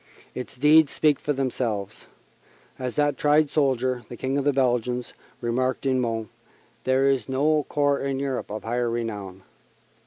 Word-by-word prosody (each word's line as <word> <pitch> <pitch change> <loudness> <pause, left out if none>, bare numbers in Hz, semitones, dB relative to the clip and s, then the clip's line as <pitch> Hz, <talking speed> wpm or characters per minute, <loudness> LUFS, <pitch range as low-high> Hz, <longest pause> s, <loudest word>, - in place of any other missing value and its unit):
Its 125 0 -7
deeds 150 +2 +5
speak 150 -3 +2
for 150 - -2
themselves. 120 -7 -2 0.7
As 125 -2 -4
that 145 -1 +1
tried 150 0 +3
soldier, 130 -4 +1
the 120 - -8
King 130 +3 -2
of 140 - +1
the 145 - +3
Belgians, 125 -2 0 0.3
remarked 130 +3 -1
in 130 -1 +2
Mons, 115 -2 -2 0.6
there 130 +1 +3
is 135 -3 +1
no 150 +3 +1
corps 145 -1 +2
in 135 -1 -1
Europe 135 -2 -3
of 110 +1 -5
higher 120 +1 -1
renown. 105 -5 -4
130 Hz, 155 wpm, -25 LUFS, 120-140 Hz, 0.7 s, deeds